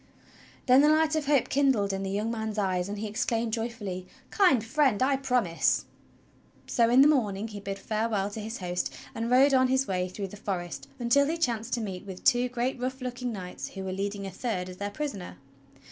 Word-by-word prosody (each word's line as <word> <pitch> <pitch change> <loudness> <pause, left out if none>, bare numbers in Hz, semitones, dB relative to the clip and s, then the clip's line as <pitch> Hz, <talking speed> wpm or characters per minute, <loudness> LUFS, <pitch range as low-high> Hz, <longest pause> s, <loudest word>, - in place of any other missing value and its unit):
Then 255 +1 +6
the 295 - +5
light 310 0 +3
of 305 -3 -1
hope 280 -4 +3
kindled 260 -8 +2
in 195 - -2
the 195 - -3
young 210 +3 -1
man's 220 -2 -3
eyes, 185 -2 0
and 205 - -4
he 215 - -4
exclaimed 225 +1 -1
joyfully: 210 -6 -4 0.2
"Kind 315 - +4
Friend, 265 -3 +2
I 275 +1 +3
promise!" 250 -10 +1 0.8
So 230 -1 +2
in 250 +3 +6
the 285 - +8
morning 220 -7 +1
he 205 -1 -7
bid 195 0 -5
farewell 215 -1 -1
to 220 - -6
his 220 +3 -5
host 180 -1 -2 0.2
and 230 +1 -3
rode 270 +3 +5
on 260 -1 +5
his 265 +1 +2
way 185 -1 -1
through 195 +1 -5
the 210 - -10
forest 180 -4 -4
until 260 +3 +3
he 325 +2 -1
chanced 240 -7 -1
to 235 - 0
meet 195 -2 -6
with 185 -1 -8
two 245 +1 +3
great, 250 +1 -2
rough 260 +1 -3
looking 250 -1 -4
knights 185 -4 -6
who 190 - -7
were 190 - -3
leading 200 +1 -3
a 195 - -5
third 185 -2 -3
as 180 - -9
their 200 +1 -3
prisoner. 205 -5 -5
225 Hz, 210 wpm, -28 LUFS, 195-255 Hz, 0.8 s, the